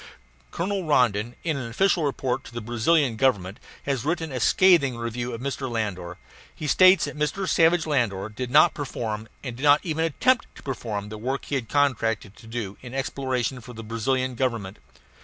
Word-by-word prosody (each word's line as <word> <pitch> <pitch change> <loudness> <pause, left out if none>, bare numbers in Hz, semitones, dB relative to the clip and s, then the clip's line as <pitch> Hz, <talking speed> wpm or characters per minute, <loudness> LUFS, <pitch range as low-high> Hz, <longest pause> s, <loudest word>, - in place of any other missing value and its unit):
Colonel 195 - -2
Rondon, 120 -5 +2
in 160 -4 -1
an 125 -4 -5
official 175 +7 +2
report 135 -2 -1
to 115 - -12
the - - -2
Brazilian 120 +3 +1
Government, 105 -7 +1 0.2
has 135 -5 -1
written 160 0 -2
a 130 - -3
scathing 150 -3 +4
review 120 +1 -3
of 115 0 -6
Mr. 135 0 -3
Landor. 95 -7 -3 0.4
He 155 - -6
states 185 +5 +6
that - - -6
Mr. 150 +6 -1
Savage 165 -1 +3
Landor 115 -10 0
did 120 +4 -5
not 150 +4 +6
perform, 110 -6 -4 0.2
and 125 -4 -5
did 125 - -10
not 145 0 +6
even 160 -2 -1
attempt 235 - +2
to - - -14
perform, 110 -6 -4
the 110 0 -7
work 130 +4 -3
he - - -7
had 125 -5 -2
contracted 115 -7 0
to 115 - -14
do 110 -4 -5
in 125 0 -9
exploration 130 -2 -2
for 125 +2 -11
the 115 0 -8
Brazilian 130 +4 -1
Government. 115 -6 -2
125 Hz, 185 wpm, -25 LUFS, 115-145 Hz, 0.4 s, states